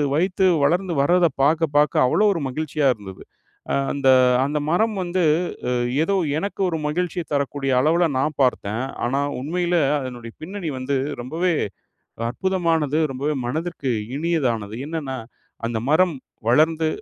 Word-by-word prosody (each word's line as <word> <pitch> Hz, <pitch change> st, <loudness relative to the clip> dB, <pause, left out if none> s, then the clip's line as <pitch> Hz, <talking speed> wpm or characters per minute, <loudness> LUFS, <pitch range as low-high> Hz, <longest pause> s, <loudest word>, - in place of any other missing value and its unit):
வைத்து 185 Hz, +3 st, +1 dB, 0.2 s
வளர்ந்து 175 Hz, +4 st, +1 dB
வர்றத 175 Hz, +3 st, +4 dB, 0.2 s
பாக்க 160 Hz, +3 st, +3 dB
பாக்க 150 Hz, -1 st, +3 dB
அவ்ளோ 210 Hz, +11 st, +3 dB
ஒரு 165 Hz, -, -3 dB
மகிழ்ச்சியா 150 Hz, 0 st, -1 dB
இருந்தது. 95 Hz, -4 st, -11 dB, 0.5 s
அ -, -, +1 dB, 0.2 s
அந்த 140 Hz, -2 st, +1 dB, 0.4 s
அந்த 150 Hz, +2 st, -1 dB
மரம் 215 Hz, +6 st, +2 dB
வந்து 180 Hz, +1 st, -1 dB, 0.5 s
அ -, -, +1 dB, 0.3 s
ஏதோ 195 Hz, +4 st, +1 dB, 0.2 s
எனக்கு 200 Hz, +4 st, -4 dB
ஒரு 165 Hz, -, -1 dB
மகிழ்ச்சிய 175 Hz, +3 st, -2 dB
தரக்கூடிய 140 Hz, -1 st, -1 dB
அளவுல 165 Hz, +5 st, +3 dB
நான் 150 Hz, +2 st, -1 dB
பார்த்தேன், 115 Hz, -3 st, 0 dB, 0.2 s
ஆனா 135 Hz, +3 st, 0 dB, 0.2 s
உண்மையில 175 Hz, +5 st, -1 dB, 0.3 s
அதனுடைய 120 Hz, -3 st, -7 dB
பின்னணி 185 Hz, 0 st, -5 dB
வந்து 135 Hz, +2 st, -1 dB, 0.3 s
ரொம்பவே 165 Hz, +8 st, 0 dB, 0.8 s
அற்புதமானது 165 Hz, -2 st, 0 dB
ரொம்பவே 140 Hz, +4 st, -2 dB
மனதிற்கு 155 Hz, 0 st, -2 dB, 0.3 s
இனியதானது. 125 Hz, -11 st, -1 dB
என்னன்னா, 145 Hz, -5 st, -4 dB, 0.5 s
அந்த 115 Hz, -1 st, -2 dB
மரம் 165 Hz, 0 st, +3 dB, 0.3 s
வளர்ந்து 160 Hz, +6 st, +3 dB
155 Hz, 130 wpm, -22 LUFS, 135-175 Hz, 0.8 s, வர்றத